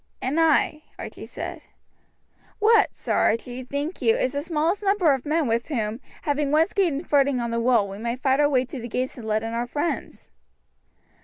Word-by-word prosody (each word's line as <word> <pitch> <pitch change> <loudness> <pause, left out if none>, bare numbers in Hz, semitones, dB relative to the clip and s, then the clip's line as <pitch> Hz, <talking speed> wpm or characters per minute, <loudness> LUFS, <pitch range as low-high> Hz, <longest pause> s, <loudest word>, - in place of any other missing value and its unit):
"And 275 +6 -1
I," 315 -1 +3 0.2
Archie - - -8
said. - - -6 1.0
"What, 435 0 +4
Sir - - -3
Archie, 245 +3 0
think 285 +7 -4
you 225 -3 +4
is 255 - 0
the 285 - -1
smallest 330 +4 0
number 390 -7 +3
of 265 +1 -4
men 315 +1 +1
with 230 +1 0
whom, 225 -4 -2 0.2
having 290 -1 0
once 315 +5 +3
gained 345 -6 0
footing 280 -2 +3
on 235 -1 -2
the 230 - 0
wall, 235 -4 +3
we 195 +1 -8
may 235 +1 -2
fight 265 +1 +1
our 290 0 +4
way 260 -3 +2
to 255 +1 -7
the 235 - -6
gates 255 +2 -3
and 220 - -8
let 215 0 0
in 225 0 -4
our 235 +1 -2
friends." 290 +6 -4
275 Hz, 200 wpm, -24 LUFS, 235-310 Hz, 1.0 s, What